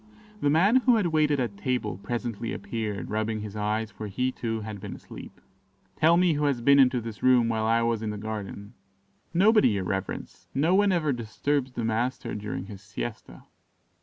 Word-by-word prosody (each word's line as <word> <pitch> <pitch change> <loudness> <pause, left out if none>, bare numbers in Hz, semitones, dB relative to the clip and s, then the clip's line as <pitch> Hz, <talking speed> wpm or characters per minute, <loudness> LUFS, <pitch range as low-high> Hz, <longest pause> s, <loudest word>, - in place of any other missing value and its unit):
The 145 - +2
man 190 - +5
who 255 -1 +4
had 215 -4 +2
waited 155 -3 +2
at 115 -6 -2
table 120 -3 -2
presently 115 +1 -4
appeared, 105 -5 -4
rubbing 110 0 -1
his 105 -1 -7
eyes, 105 +1 -1
for 105 +2 -7
he, 125 +6 -1
too, 115 -3 -3
had 105 -2 -7
been - - -6
asleep. - - -11 0.6
"Tell 165 +2 +4
me 180 -2 +4
who 150 0 0
has 140 -4 +1
been 140 +4 +5
into 130 -2 +5
this 110 -3 -8
room 125 -2 +4
while 110 -1 0
I 115 +1 +3
was 115 -2 0
in 110 - -2
the 105 - -4
garden." 105 0 -6 0.6
"Nobody, 210 +5 +5
your 100 -3 -1
reverence; 95 +1 -4
no 155 +6 +3
one 200 +1 +4
ever 155 -6 +1
disturbs 125 +3 -2
the 115 - -3
master 115 +2 -1
during 105 -3 -4
his 100 -1 -10
siesta." 110 +1 -7
115 Hz, 190 wpm, -27 LUFS, 105-145 Hz, 0.6 s, man